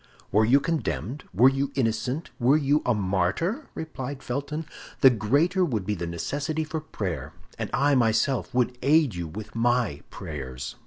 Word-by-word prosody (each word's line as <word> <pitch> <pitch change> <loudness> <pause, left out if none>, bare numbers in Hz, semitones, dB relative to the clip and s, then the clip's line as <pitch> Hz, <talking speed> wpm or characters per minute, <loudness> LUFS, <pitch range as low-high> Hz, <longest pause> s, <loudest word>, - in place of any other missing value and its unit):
"Were 110 +2 +4
you 130 +5 +5
condemned, 150 -3 -2
were 115 +8 +6
you 135 +1 +1
innocent, 130 +4 -1
were 130 +4 +5
you 145 0 +2
a 125 - +3
martyr," 100 - 0
replied 140 -4 -6
Felton, 145 +5 -3 0.4
"the 135 - +9
greater 145 - +2
would 115 - -1
be 105 - 0
the 85 -3 -4
necessity 145 - -2
for 155 0 -4
prayer; 90 - -4 0.3
and - - -2
I 140 +1 +3
myself 120 +2 +2
would 125 -1 0
aid 145 -2 +4
you 85 -1 -4
with 110 +6 -8
my 115 - +1
prayers." 65 -1 -6
125 Hz, 160 wpm, -26 LUFS, 105-145 Hz, 0.4 s, the